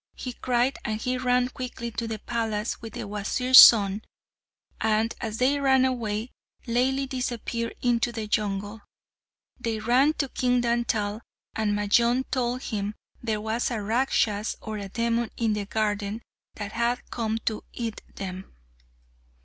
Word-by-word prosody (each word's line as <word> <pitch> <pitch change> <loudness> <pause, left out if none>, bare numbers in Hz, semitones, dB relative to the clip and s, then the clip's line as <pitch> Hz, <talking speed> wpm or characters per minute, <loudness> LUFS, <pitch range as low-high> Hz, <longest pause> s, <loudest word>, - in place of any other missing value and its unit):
he 250 - -6
cried, 245 +2 0
and 215 0 -2
he 255 +2 0
ran 250 0 +2
quickly 245 -2 -6
to 230 +1 -3
the 220 -1 -3
palace 220 -1 -2
with 225 -2 -8
the - - -5
Wazir's 210 +6 +5
son; 205 -2 +8 0.8
and 220 +1 +1
as 225 -2 -3
they 270 +4 +2
ran 265 -2 +4
away, 230 -2 -2 0.3
Laili 260 +3 +1
disappeared 240 -2 -3
into 240 -1 +2
the 225 -2 -4
jungle. 210 0 -2 0.8
They 230 -2 -2
ran 250 +7 +3
to 285 -3 -1
King 250 -1 +1
Dantal, 230 -3 0 0.3
and 210 -2 0
Majnun 235 +5 +3
told 250 0 -1
him 210 -1 -3 0.3
there 220 -3 -2
was 220 +2 -1
a 235 -3 -2
Rakshas 215 -1 0
or 220 -1 -5
a 200 -1 -6
demon 235 +2 0
in 225 -2 +1
the 205 -1 -3
garden 210 0 -1 0.3
that 205 -1 -5
had 235 +2 -1
come 225 -2 -1
to 215 -1 -1
eat 230 -3 -5
them. 190 -1 -6
230 Hz, 150 wpm, -26 LUFS, 215-245 Hz, 0.8 s, son